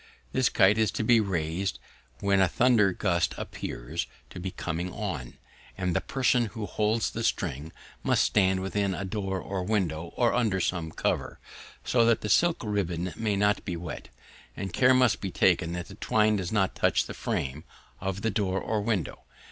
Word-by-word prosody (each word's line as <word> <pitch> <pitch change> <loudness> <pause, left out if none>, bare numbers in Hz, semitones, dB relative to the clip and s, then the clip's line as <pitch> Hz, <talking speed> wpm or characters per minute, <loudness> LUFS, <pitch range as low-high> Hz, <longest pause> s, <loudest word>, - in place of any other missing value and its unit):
This 130 -2 +2
kite 100 +3 +4
is 110 -2 +3
to - - -1
be 115 +1 +5
raised 90 -2 -1 0.4
when 100 -1 +3
a 95 - +5
thunder 115 -3 +4
gust 90 -2 0
appears 65 +3 -5 0.2
to - - -8
be 95 +2 -3
coming 90 0 -4
on, 90 - -5 0.4
and 90 -2 -1
the - - +2
person 125 -3 +1
who 110 0 -5
holds 105 +2 0
the - - -4
string 75 +5 -1 0.3
must - - +2
stand 95 -2 +2
within 95 0 -1
a 95 - -4
door 95 -1 -2
or 95 0 -4
window, 85 -5 -1
or 120 -2 +2
under 110 -6 +1
some 85 -3 -1
cover, - - -2 0.5
so 120 -2 +3
that 115 -1 +3
the 105 - -3
silk 170 - +3
ribbon 95 -4 -2
may 110 -2 0
not 105 +1 +2
be 90 - -3
wet; 85 0 -7 0.5
and 95 -2 -4
care 130 0 +5
must 125 -5 +3
be 95 - -2
taken 90 -2 +2
that 90 0 -4
the 100 - -11
twine 105 +1 +2
does 90 -3 -3
not 95 -4 +1
touch - - +2
the - - -7
frame 70 +4 -3 0.4
of 95 +1 -4
the 115 - +1
door 95 -2 0
or 110 -1 -1
window. 105 -6 -2
95 Hz, 185 wpm, -28 LUFS, 90-110 Hz, 0.5 s, be